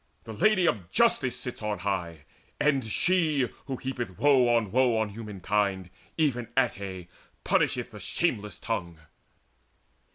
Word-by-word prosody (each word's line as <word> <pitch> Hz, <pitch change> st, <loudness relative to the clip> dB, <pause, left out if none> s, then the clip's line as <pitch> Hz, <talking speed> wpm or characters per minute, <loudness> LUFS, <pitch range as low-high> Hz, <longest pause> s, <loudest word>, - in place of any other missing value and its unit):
The 110 Hz, -, -8 dB
Lady 185 Hz, -, +3 dB
of 100 Hz, -, 0 dB
Justice -, -, +2 dB
sits -, -, -6 dB
on 105 Hz, -1 st, -2 dB
high; 85 Hz, -6 st, -3 dB, 0.3 s
and 150 Hz, -3 st, +2 dB
she 155 Hz, -, +1 dB, 0.2 s
Who 135 Hz, -2 st, -3 dB
heapeth 120 Hz, -8 st, -5 dB
woe 135 Hz, -4 st, +5 dB
on 115 Hz, -4 st, +2 dB
woe 125 Hz, -2 st, +3 dB
on 110 Hz, -1 st, 0 dB
humankind, 100 Hz, -3 st, -2 dB, 0.3 s
Even 130 Hz, -7 st, +1 dB
Ate, 95 Hz, -2 st, -1 dB, 0.4 s
punisheth -, -, +1 dB
the -, -, -10 dB
shameless 105 Hz, 0 st, -1 dB
tongue." 85 Hz, -7 st, -4 dB
110 Hz, 130 wpm, -28 LUFS, 100-130 Hz, 0.4 s, woe